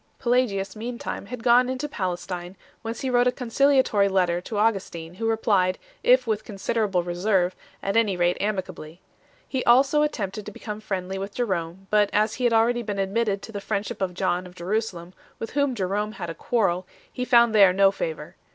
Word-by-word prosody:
Pelagius 225 -6 0
meantime 235 -2 -5
had 245 0 -7
gone 245 +1 +5
into 260 +3 -3
Palestine, 180 -5 -4 0.2
whence 225 +1 -5
he 265 - -1
wrote 245 0 +4
a - - +4
conciliatory 250 -5 +2
letter 180 -2 +1
to 210 +3 -6
Augustin, 195 -6 -1
who 225 +5 -3
replied, 200 -5 +2 0.2
if 255 +1 +4
with 220 -2 -1
considerable 200 -3 -1
reserve, 180 +1 0 0.3
at 195 +1 -1
any 215 -5 +2
rate 175 0 +2
amicably 185 -5 -4 0.5
3. 265 - 0
He - - -2
also 270 +5 +5
attempted 210 -9 -2
to - - -5
become 210 +1 -7
friendly 190 -2 -4
with 200 +1 -6
Jerome; 190 -5 -2
but 210 -1 +4
as 215 +1 +2
he 250 - -2
had 240 - +4
already 235 +2 +3
been 205 -3 -4
admitted 195 +1 0
to - - -8
the 205 -2 -5
friendship 200 0 -3
of 180 -2 -1
John 185 -1 -1
of 180 - -15
Jeru 190 +6 0
salem, 180 -5 -9 0.2
with 225 - -6
whom 280 -2 +1
Jerome 205 +1 -2
had 170 -5 -5
a - - -6
quarrel, 185 -2 0 0.3
he 250 - -3
found 235 -2 +5
there 200 -3 +7
no 195 +1 +4
favour. 485 - -5
205 Hz, 190 wpm, -25 LUFS, 185-235 Hz, 0.5 s, there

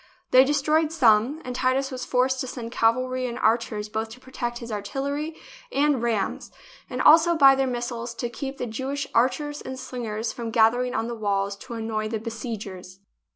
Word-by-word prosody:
They 255 +1 +8
destroyed 300 +3 +2
some, 255 0 +3
and 250 -1 -5
Titus 265 +2 +1
was 255 -1 -5
forced 255 +1 +1
to 260 - -2
send 235 -2 -6
cav 225 -1 +3
alry 255 0 -2
and 235 - -6
archers 220 -2 +1
both 220 +1 -3
to 230 +3 -11
protect 245 -2 -5
his 235 -1 -8
artillery 280 +9 -3 0.4
and 285 -2 +2
rams, 225 -5 -1 0.4
and - - -2
also 330 +2 +6
by 275 -3 +8
their 270 0 +1
missiles 240 -1 -4
to 235 +1 -3
keep 270 +3 -6
the - - -3
Jewish 265 +5 -3
archers 290 +5 +1
and 260 0 -6
slingers 235 -4 -4
from 235 -2 -5
gathering 245 +2 +3
on 225 - 0
the 235 - -4
walls 200 -2 -1
to 235 - -8
annoy 220 -1 -2
the 220 +1 -2
besiegers. 210 -5 -6
245 Hz, 185 wpm, -25 LUFS, 225-270 Hz, 0.4 s, They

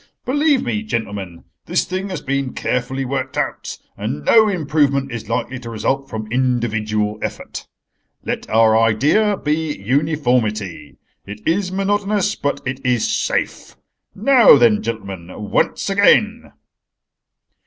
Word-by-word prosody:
"Believe 290 0 +2
me, 215 - -2
gentlemen, 100 - -5 0.2
this - - +1
thing 185 +2 -4
has 180 -5 -5
been 140 -1 -2
carefully 130 +2 -2
worked 135 0 -3
out, - - -3 0.2
and 75 +1 -5
no 220 -1 +6
improvement 145 -6 0
is 115 -2 -6
likely 130 +1 -2
to 120 -1 -8
result 135 +5 -2
from 110 -1 -5
individual 110 -4 0
effort. - - -6 0.6
Let - - -4
our 110 0 +4
idea 140 - +3
be 155 0 -2
uniformity. 125 - -1 0.3
It 105 +1 -9
is 185 +3 +1
monotonous, 205 +1 0
but 140 -6 -3
it 130 +1 -4
is 125 -3 +1
safe. - - -2 0.4
Now, 235 - +6
then, 115 -4 +4
gentlemen, 100 -6 -5 0.2
once - - +1
again." 210 +3 +3
135 Hz, 125 wpm, -19 LUFS, 110-185 Hz, 0.6 s, no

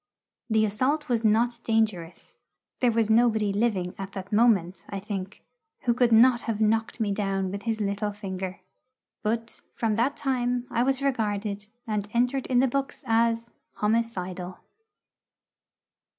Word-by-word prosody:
The 220 -1 +3
assault 260 +8 0
was 235 -2 +1
not 230 +2 +2
dangerous. 215 -7 -1 0.4
There 245 -2 +3
was 225 -1 +1
nobody 220 -3 +3
living 200 -4 0
at 195 0 -6
that 195 +1 -7
moment, 195 -6 +3
I 200 - -4
think, 195 0 -6 0.4
who 240 - +2
could 245 0 +2
not 235 +1 +6
have 215 -2 -1
knocked 220 +2 +1
me 215 -3 0
down 195 -2 -1
with 200 +1 -5
his 225 0 -2
little 205 0 -1
finger. 190 -2 -6 0.6
But 230 +1 -2
from 225 -2 0
that 255 +5 +1
time 245 -2 0
I 235 - +1
was 270 +2 +1
regarded, 210 -5 -1 0.2
and 210 -3 -2
entered 250 +3 +1
in 250 -1 +3
the 265 - +3
books, 275 +2 -3
as 230 +1 +1 0.2
'homicidal.' 190 -5 -2
220 Hz, 145 wpm, -26 LUFS, 200-235 Hz, 0.6 s, not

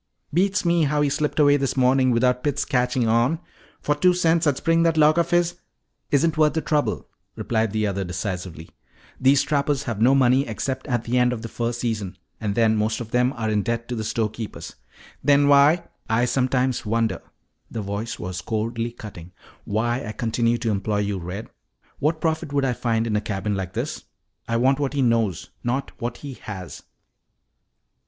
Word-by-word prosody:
"Beats 190 +3 +1
me 170 -2 +3
how 150 +1 +1
he 145 - +2
slipped 150 +2 -1
away 145 -1 +5
this 135 -1 -2
morning 130 0 +4
without 125 +1 +2
Pitts 145 -1 0
catching 125 -3 +1
on. 120 +8 +2 0.4
For 145 - +1
two 180 +5 +3
cents 165 -2 +2
I'd 140 -3 +2
spring 165 0 +2
that 165 -1 +2
lock 155 +2 +5
of 170 - +1
his 175 0 +1 0.3
" - - -52 0.2
"Isn't 155 +3 +2
worth 155 -1 +4
the 160 - 0
trouble," 145 - -1 0.3
replied 110 -2 -1
the 110 0 0
other 100 -1 -1
decisively. 90 -3 -5 0.5
"These 135 +1 +4
trappers 145 -1 0
have 115 -3 -4
no 130 +4 +5
money 130 0 +3
except 130 +5 -4
at 120 -4 0
the 125 +2 +1
end 125 0 +3
of 120 -2 -4
the - - -4
fur 120 +1 -2
season, 110 -6 -3 0.2
and 105 -2 -2
then 110 -2 +3
most 110 +1 0
of 115 -2 -7
them 125 +1 +2
are 110 -2 -2
in 105 -1 +2
debt 115 +2 -2
to 125 - -2
the 110 - -3
storekeepers." 110 0 -4 0.5
"Then 140 +1 +4
why 145 +4 +5
" - - -48
"I 115 +2 +2
sometimes 130 0 0
wonder," 115 -2 0 0.5
the 115 - -4
voice 100 +3 -4
was 90 0 -5
coldly 115 +4 -2
cutting, 90 -7 -10 0.3
"why 120 +5 -1
I 110 - -5
continue 115 +1 0
to 115 -1 -1
employ 105 +1 -1
you, 100 -2 -2
Red. 90 +5 -6 0.5
What 155 +2 0
profit 160 -2 -1
would 140 -1 +1
I 130 - +1
find 115 -2 0
in 110 -2 -1
a 105 - +1
cabin 105 0 -2
like 95 -2 -4
this? - - -4 0.4
I 115 - 0
want 130 +3 +3
what 140 -1 -1
he 140 -2 +1
knows, 115 -7 0
not 130 +3 -2
what 120 0 -3
he 140 - -5
has." 95 -4 -7
120 Hz, 195 wpm, -23 LUFS, 110-140 Hz, 0.5 s, away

